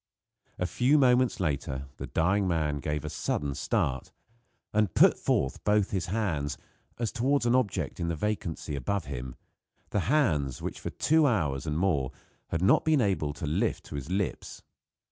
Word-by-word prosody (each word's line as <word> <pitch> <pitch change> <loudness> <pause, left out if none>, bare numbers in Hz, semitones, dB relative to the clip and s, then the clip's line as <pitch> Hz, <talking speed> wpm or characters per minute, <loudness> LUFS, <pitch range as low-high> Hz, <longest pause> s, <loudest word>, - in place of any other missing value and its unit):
A 90 - -1
few 125 - +3
moments 125 -2 +3
later 70 -5 -2
the - - -6
dying 95 +4 +1
man 80 -4 0
gave 75 +2 -3
a - - -3
sudden 75 -2 -2
start, - - -1 0.6
and 105 -5 +1
put - - +6
forth 65 - -1
both 105 -1 +2
his 95 -3 -1
hands, 90 -8 -1 0.4
as 115 -3 -1
toward 130 +2 +1
an 120 - +3
object 120 -9 0
in 85 - -1
the 85 - -1
vacancy 85 -5 -3
above 85 +8 -2
him 65 -2 -6 0.6
the 105 - +1
hands, 80 - +2
which - - -5
for - - -4
two 160 -1 +3
hours 80 - 0
and 75 0 -1
more 80 -8 +1
he - - -27 0.3
had 85 +1 -2
not 95 - +5
been 155 -2 +3
able 95 - +1
to 75 - -6
lift 75 - 0
to - - -9
his 70 +1 -5
lips. 95 +1 -3
90 Hz, 175 wpm, -28 LUFS, 75-110 Hz, 0.6 s, put